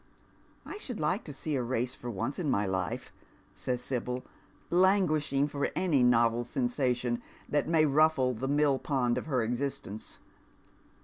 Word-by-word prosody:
" - - -33
I 415 - -7
should 250 - -5
like 160 +8 0
to 150 - -6
see 145 +2 -3
a 130 - +1
race 125 +1 -1
for 125 - -7
once 115 - -3
in 160 -5 -1
my 100 -4 +2
life," 95 -2 -3 0.4
sajs 125 -1 -2
Sibyl, 125 0 -3 0.5
languishing 170 -7 +3
for 145 -1 -1
any 175 -7 +2
novel 120 -1 +4
sensation 125 -1 0 0.3
that 145 -1 0
may 160 -2 +4
mffle 140 -5 +3
the 135 - -2
mill 145 -1 +3
po.'id 125 -4 0
of - - -9
her 130 -6 +1
existence. 120 -3 -3
130 Hz, 160 wpm, -30 LUFS, 120-150 Hz, 0.5 s, novel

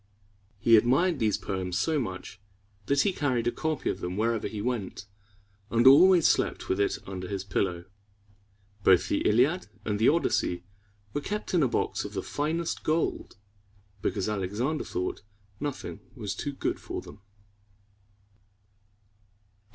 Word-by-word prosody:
He 115 +2 +6
admired 140 +9 +3
these 110 -3 +2
poems 95 -2 -3
so 155 - +1
much 95 -3 -6 0.5
that 140 0 +3
he 200 - +1
carried 130 -8 0
a 120 - +2
copy 155 +2 -2
of - - -1
them 90 +1 -4
with 110 - +1
him 115 - +3
wherever 115 -2 -2
he 110 - -6
went, 105 -3 -3 0.6
and 115 +1 +2
always 170 +6 +8
slept - - +1
with 95 - +1
it 100 - +1
under 95 -1 -6
his 95 0 -3
pillow. 95 -3 -1 1.0
Both 95 -2 +5
the - - +1
Iliad 135 - +2 0.2
and 105 -2 -1
the 110 - +5
Odyssey 90 - +1 0.5
were 145 - -1
kept 210 +6 -4
in 175 - +4
a 135 - +4
box - - -1
of - - -7
the - - -3
finest 160 +3 -2
gold, 155 -8 -1 0.6
because 100 -1 -1
Alexander 105 +9 -1
thought 90 - -3 0.4
nothing 145 -2 -5 0.2
was 105 -7 -4
too 145 - -4
good - - -2
for - - -5
them. 100 - -13
115 Hz, 150 wpm, -28 LUFS, 100-145 Hz, 1.0 s, always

